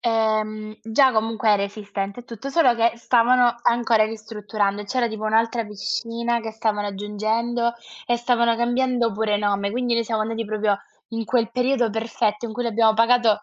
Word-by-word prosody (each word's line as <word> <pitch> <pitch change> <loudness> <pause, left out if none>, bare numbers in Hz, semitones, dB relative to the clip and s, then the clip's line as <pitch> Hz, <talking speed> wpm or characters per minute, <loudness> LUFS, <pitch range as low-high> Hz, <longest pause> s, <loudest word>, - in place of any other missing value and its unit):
ehm, 215 -1 -1
già 260 +4 +4
comunque 220 0 0
era 205 -1 +3
esistente 200 +1 -5
e - - -16
tutto, 235 +3 -8
solo 275 -4 +4
che 230 0 +3
stavano 240 +1 +3
ancora 235 -2 +3
ristrutturando 210 -2 -3
e - - -10
c'era 240 +2 0
tipo 215 -1 -6
un'altra 230 +1 +1
piscina 230 +3 -2
che 225 -1 -6
stavano 215 -2 -1
aggiungendo 220 +4 -1 0.3
e 240 - +2
stavano 235 -1 +2
cambiando 240 0 +1
pure 210 0 0
nome, 200 -1 0
quindi 245 0 0
noi 230 0 +1
siamo 220 -1 -1
andati 225 +1 -3
proprio 210 -1 0 0.3
in 230 -1 -4
quel 230 -1 0
periodo 250 -1 +1
perfetto 220 0 -1
in 220 - -7
cui 245 - -3
l'abbiamo 225 -1 +3
pagato 230 -2 +3
225 Hz, 170 wpm, -23 LUFS, 215-235 Hz, 0.3 s, già